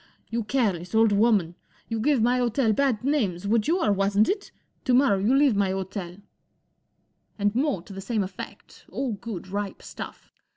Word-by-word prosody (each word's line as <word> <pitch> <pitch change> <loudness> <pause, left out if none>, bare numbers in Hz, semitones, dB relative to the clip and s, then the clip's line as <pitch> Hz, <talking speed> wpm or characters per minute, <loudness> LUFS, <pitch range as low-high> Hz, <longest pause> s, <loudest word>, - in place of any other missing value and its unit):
" - - -39
You 230 0 -1
careless 210 -6 -1
old 225 -1 +5
woman! 205 -5 +3 0.3
You 225 -1 -2
give 260 0 +2
my 245 +2 +3
hotel 240 -1 +2
bad 255 -2 +1
names, 205 - 0
would 215 0 +2
you 345 +2 +2
or 210 - +3
wasn't 200 +2 +2
it? 400 0 -2 0.3
To 255 -3 +3
morrow 250 -7 +4
you 220 +7 +2
leave 275 -5 +4
my 200 -1 +2
hotel," 190 -1 -4 1.2
And 205 -1 +1
more 260 - 0
to 200 - -11
the 195 - -7
same 215 0 -1
effect, 185 0 -10
all 270 -3 -2
good,_ripe 200 -1 -5
stuff. - - -9
215 Hz, 175 wpm, -26 LUFS, 195-250 Hz, 1.2 s, old